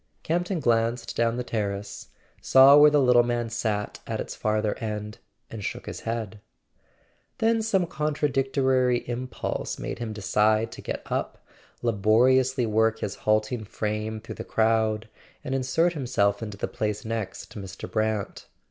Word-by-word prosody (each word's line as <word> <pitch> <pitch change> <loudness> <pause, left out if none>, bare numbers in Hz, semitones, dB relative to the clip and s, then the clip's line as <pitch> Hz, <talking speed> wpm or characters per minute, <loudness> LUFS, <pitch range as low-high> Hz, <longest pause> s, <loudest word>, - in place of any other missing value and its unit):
Campton 175 +2 -1
glanced 115 -2 0
down 115 0 +1
the 125 - -2
terrace, 100 -3 -4 0.3
saw 135 +1 +7
where 150 0 +8
the 150 0 +3
little 125 -2 +5
man 120 -1 -2
sat 110 -3 -2
at - - -3
its - - -4
farther 110 -1 0
end, 105 -1 -5 0.3
and 110 -2 -6
shook - - -4
his - - -6
head. 110 -2 -4 1.0
Then 225 0 +2
some 195 -5 +1
contradic¬ 145 -4 -1
tory 130 -3 +2
impulse 125 +1 -4
made - - -5
him 115 -2 -4
decide 110 +2 +1
to - - -9
get - - -5
up, - - -3 0.4
laboriously 120 +4 +3
work 110 0 +2
his 100 - -2
halting 110 +2 0
frame 105 +1 -3
through 115 - -8
the - - -5
crowd, 110 0 +1 0.4
and 130 - -3
insert 135 +7 +1
himself 115 -8 0
into 105 -3 -6
the - - -2
place 105 0 -3
next 110 -4 -4
to - - -8
Mr. 95 -1 -8
Brant. 110 -2 -2
115 Hz, 155 wpm, -26 LUFS, 110-130 Hz, 1.0 s, where